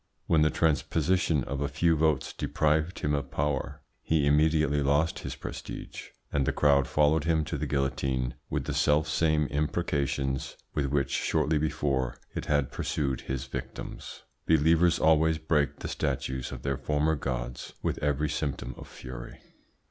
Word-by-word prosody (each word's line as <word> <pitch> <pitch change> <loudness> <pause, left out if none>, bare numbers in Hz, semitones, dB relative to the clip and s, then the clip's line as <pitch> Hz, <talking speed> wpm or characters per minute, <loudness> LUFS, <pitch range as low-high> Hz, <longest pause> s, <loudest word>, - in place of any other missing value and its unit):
When 80 -2 +3
the 75 - +5
transposition 80 0 +1
of 70 +2 -4
a 70 - +1
few 80 +4 +2
votes 80 -3 +1
deprived 80 +3 0
him 75 - +1
of 70 -2 -2
power, 70 -1 -2 0.2
he 80 -3 +1
immediately 75 0 +3
lost 75 +4 +2
his - - -5
prestige, - - -7 0.3
and 70 -2 +1
the - - +3
crowd 70 -2 +3
followed 75 +1 +3
him 80 -2 +2
to - - -3
the - - -2
guillotine 65 -2 -1 0.2
with - - -2
the - - -2
self 75 +1 +3
same 80 0 +2
imprecations 70 -2 -1 0.2
with 70 -2 0
which 70 -1 0
shortly 75 0 +1
before 70 -4 -1 0.2
it - - -4
had 70 -3 +1
pursued 70 -3 -2
his 65 0 -4
victims. 65 - -7 0.2
Believers 80 +2 +4
always 80 0 +4
break 75 -2 +1
the - - -3
statues 65 -1 -2
of - - -7
their 70 -1 -1
former 75 +3 +1
gods 60 -4 -4
with - - -1
every 75 0 +1
symptom 70 -4 -3
of - - -9
fury. - - -9
75 Hz, 155 wpm, -28 LUFS, 70-80 Hz, 0.3 s, the